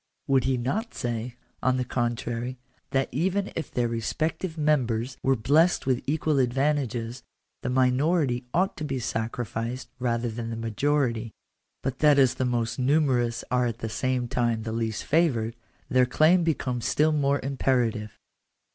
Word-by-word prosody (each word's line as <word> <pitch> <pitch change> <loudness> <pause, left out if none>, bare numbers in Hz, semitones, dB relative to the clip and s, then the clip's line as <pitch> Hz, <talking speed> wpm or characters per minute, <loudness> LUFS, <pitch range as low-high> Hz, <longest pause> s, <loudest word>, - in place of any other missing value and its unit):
Would 135 -2 +2
he 130 -1 +2
not 185 - -2
say, 120 0 -3 0.3
on 130 0 +2
the 125 - -1
contrary, 120 +1 -2 0.3
that 135 0 +1
even 190 +8 0
if 165 - -3
their 120 -1 0
respective 155 +9 -2
members 130 -5 +1
were 135 0 +3
blessed 150 +10 +3
with 130 -2 +1
equal 155 +1 +1
^CJ 135 -2 +4
advantages, 125 -2 -1 0.4
the 125 - -2
minority 130 +1 +2
ought 185 +3 +1
to 155 - -5
be 140 -3 -2
sacrificed 120 +1 -3
rather 120 -1 0
than 115 +1 -5
the 115 - -3
y 115 - -6
majority; 115 -1 0 0.5
but 135 -1 -3
that 150 -2 +5
as 130 -3 +5
the 130 - -1
most 120 0 -1
numerous 130 -4 +2
are 125 -1 +2
at 115 -1 -3
the 110 - -4
same 125 +2 -1
time 120 -2 0
the 110 - -4
least 110 -1 -2
favoured, 125 -9 +1 0.3
their 125 -1 +3
claim 160 +7 +4
becomes 130 -7 -1
still 155 +1 +3
more 140 -2 +2
imperative. 125 -5 0
125 Hz, 160 wpm, -26 LUFS, 120-145 Hz, 0.5 s, that